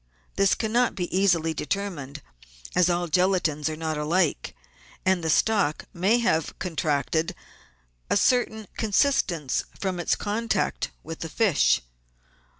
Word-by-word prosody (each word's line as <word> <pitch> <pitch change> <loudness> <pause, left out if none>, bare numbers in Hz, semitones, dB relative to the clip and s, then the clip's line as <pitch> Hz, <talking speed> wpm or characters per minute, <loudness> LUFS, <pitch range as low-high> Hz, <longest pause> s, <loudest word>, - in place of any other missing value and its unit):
This 195 -1 +3
cannot 235 +3 +1
be 180 -1 -3
easily 175 -4 +2
determined, 150 -5 -4 0.5
as 180 0 +4
all 175 0 0
gelatines 170 -3 +1
are 155 - -4
not 155 -1 -3
alike, 165 +2 0 0.5
and 185 -2 +2
the 160 - -1
stock 195 -3 +2
may 190 +7 +2
have 165 -9 0
contracted 160 -2 -1 0.7
a - - +3
certain 220 -4 +1
consistence 205 - +1 0.2
from 190 -2 -2
its 175 - +1
contact 225 +3 -1
with 165 +1 -7
the 165 - -5
fish. 200 -2 +2
175 Hz, 125 wpm, -25 LUFS, 160-200 Hz, 0.7 s, as